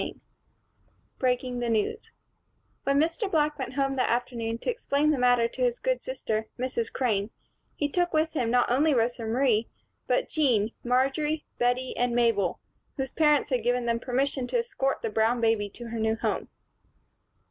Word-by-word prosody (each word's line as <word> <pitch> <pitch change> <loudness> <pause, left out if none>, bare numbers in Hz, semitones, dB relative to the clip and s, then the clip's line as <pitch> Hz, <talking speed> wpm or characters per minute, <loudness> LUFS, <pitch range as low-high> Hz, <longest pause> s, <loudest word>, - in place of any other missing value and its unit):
CHAPTER - - -4
X - - -29 1.0
Breaking 250 -1 0
the 240 -1 -1
News 220 -2 -1 0.8
WHEN 275 0 +3
Mr. 335 +6 0
Black 300 -3 +1
went 255 -1 -4
home 270 -1 0
that 255 - +1
afternoon 235 -1 -1
to 235 - -4
explain 305 - +1
the 290 - 0
matter 245 -2 +4
to 255 - -8
his 245 -1 +2
good - - -1
sister, 220 - -3
Mrs. 245 -2 -2
Crane, 215 -5 0 0.5
he 290 - 0
took 350 +4 0
with 315 +1 +1
him 245 -7 0
not 245 0 +2
only 290 +3 +3
Rosa 240 +1 0
Marie, 230 -2 +2 0.4
but - - +1
Jean, 240 -9 +2
Marjory, 275 +5 +1
Bettie 245 +1 0
and 245 -1 0
Mabel, 230 -7 +2 0.4
whose 265 -2 -3
parents 300 -2 +3
had 250 -2 +1
given 245 +1 0
them 235 0 +1
permission 260 +1 -1
to - - 0
escort 395 - -1
the 225 - 0
brown 225 +3 +2
baby 225 -3 +1
to 235 +3 -9
her 230 0 -4
new 220 0 +1
home. - - -2
250 Hz, 175 wpm, -27 LUFS, 230-285 Hz, 1.0 s, matter